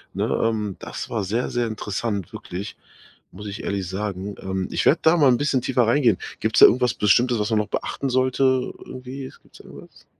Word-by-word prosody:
ne, - - -1
ähm, 105 -4 -1
das - - -7
war 110 -4 -1
sehr, 115 +6 -2
sehr 120 -1 0
interessant 105 -3 -4
wirklich, 95 +4 -7 0.6
muss 105 +3 -9
ich 100 +2 -6
ehrlich 95 -3 -3
sagen. 100 0 -4
Ähm, 95 -1 -3
ich - - -1
werde 160 - +5
da 160 +2 +5
mal 145 -4 +5
'n 120 - +3
bisschen 140 -3 +1
tiefer 125 -3 +1
reingehen. 120 -5 +3 0.2
Gibt's - - +1
da - - +11
irgendwas 125 -1 +2
Bestimmtes, 120 +3 +3
was 105 +1 -1
man 110 - +1
noch 105 - -1
beachten 135 - -3
sollte 130 +1 +1 0.4
irgendwie? 130 +1 -8
Gibt's - - -19
da - - -14
irgendwas? - - -14
115 Hz, 200 wpm, -23 LUFS, 100-130 Hz, 0.6 s, da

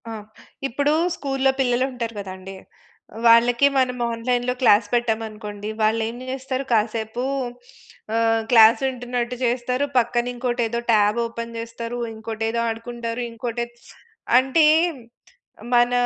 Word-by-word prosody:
ఆ! - - -5 0.6
ఇప్పుడు 285 +4 0 0.2
స్కూల్లో 270 -3 0
పిల్లలు 250 -1 +2
ఉంటారు 235 -2 -4
కదండీ! 190 0 -8 0.7
వాళ్ళకి 235 +3 +6
మనం 255 -1 +1
ఆన్‌లైన్‌లో 245 +2 -1
క్లాస్ 215 -3 +5
పెట్టామనుకోండి, 220 -3 -2
వాళ్ళు 220 +1 +2
ఏం 235 - -8
చేస్తారు? 265 0 -3
కాసేపు 220 +1 0 0.9
ఆహ్, 225 0 +2
క్లాస్ 225 -1 +7
వింటున్నట్టు 245 -1 -3
చేస్తారు, 250 +3 0
పక్కన 240 0 +1
ఇంకోటేదో 240 -1 -1
టాబ్ 210 +1 +3
ఓపెన్ 230 0 -6
చేస్తారు, 230 +1 -6 0.2
ఇంకోటేదో 225 +1 -3
ఆడుకుంటారు, 230 +1 -5
ఇంకోటి 235 +1 -3 0.7
అంటే 270 +5 +4 1.1
మన 240 0 +4
235 Hz, 110 wpm, -22 LUFS, 225-250 Hz, 1.1 s, క్లాస్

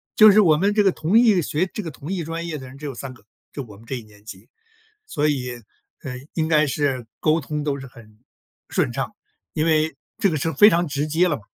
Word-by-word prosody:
就 215 -1 +9
是 215 - +5
我 165 -7 +6
们 200 +6 +1
这 210 - +4
个 195 -2 +3
同 170 +9 +3
一 220 -7 +5
学 160 +4 -1
这 210 - -4
个 165 - -5
同 145 +7 -6
一 180 -3 -2
专 165 +2 -5
业 160 -2 -4
的 130 -2 -9
人 130 +2 -12
只 150 - -9
有 140 -3 -5
3 130 +2 -7
个， 120 - -20 0.3
就 140 - -5
我 105 -5 -13
们 110 +3 -17
这 130 - -4
一 120 - -6
年 105 -1 -20
级。 110 - -11 0.6
所 150 - 0
以， 130 -4 -2 0.5
呃， 125 -2 -5 0.2
应 160 -1 -1
该 155 -1 +4
是 135 -3 -1
沟 155 +1 +3
通 150 0 -4
都 140 -2 -2
是 135 - -9
很 110 -4 -17 0.5
顺 - - 0
畅， - - -4 0.4
因 155 - 0
为 155 -2 +2 0.2
这 200 - +2
个 160 - -2
是 160 +2 -1
非 210 +5 +7
常 175 -3 +2
直 145 -1 -2
接 170 +4 +2
了 150 - 0
嘛， 105 - -16
150 Hz, 265 characters per minute, -22 LUFS, 135-170 Hz, 0.6 s, 就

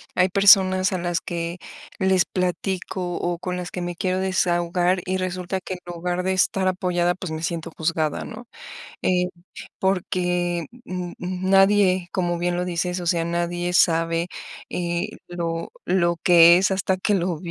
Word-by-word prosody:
hay 185 +1 +3
personas 190 -1 +5
a - - 0
las 175 -1 -1
que 170 0 -4 0.4
les 190 -1 +3
platico 180 0 -3
o 175 -1 -2
con 180 0 -3
las 180 -1 -6
que 180 - -5
me 175 0 -4
quiero 185 +1 0
desahogar 180 -1 +1
y 185 0 -1
resulta 185 0 -3
que 185 - -6
en 180 - -7
lugar 175 +1 -2
de 190 - 0
estar 190 0 +1
apoyada, 180 -1 0
pues, 185 -1 -7
me 160 0 -5
siento 165 0 -3
juzgada, 160 -2 -1
¿no? 245 - -9 0.5
Eh, 180 -1 +1 0.5
porque, 180 -2 0 0.2
mm 180 -3 -5
mm, 185 +1 -3
nadie, 195 -2 +4
como 175 -2 -1
bien 175 0 0
lo 180 - -1
dices, 180 +1 -2
o 175 - -6
sea, 170 -1 +1
nadie 175 +1 -2
sabe, 165 -1 +2 0.4
eh, 175 +3 -2 0.2
lo 170 -1 -4
lo 170 -2 +1
que 170 -1 +8
es, 190 +1 +2
hasta 190 0 0
que 195 +3 0
lo 180 -3 0
180 Hz, 165 wpm, -23 LUFS, 175-185 Hz, 0.5 s, que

